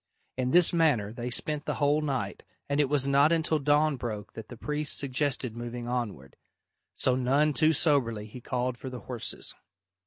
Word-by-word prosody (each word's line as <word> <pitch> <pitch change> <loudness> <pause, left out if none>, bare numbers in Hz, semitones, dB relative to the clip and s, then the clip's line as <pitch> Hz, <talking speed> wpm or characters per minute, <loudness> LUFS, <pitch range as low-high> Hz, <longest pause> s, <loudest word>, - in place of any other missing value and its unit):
In 125 -1 -1
this 175 +5 +5
manner 140 -11 +2
they 120 +1 -5
spent 150 +4 0
the - - -2
whole 145 +1 +2
night, 140 -4 -3 0.3
and 140 +1 0
it 145 -3 +3
was 140 -2 +1
not 140 +3 +4
until 160 -1 +1
dawn 145 +1 +2
broke 110 -5 -5
that 110 - -9
the 120 - -9
priest 150 +4 -2
suggested 135 -3 -1
moving 120 0 -6
onward. 115 - -4 0.6
So 130 - +2
none 140 +4 +2
too 155 +2 +4
soberly 135 -9 +2
he 115 +4 -11
called 125 0 -2
for 130 - -6
the 125 -1 -8
horses. 120 -3 -4
130 Hz, 180 wpm, -28 LUFS, 120-150 Hz, 0.6 s, this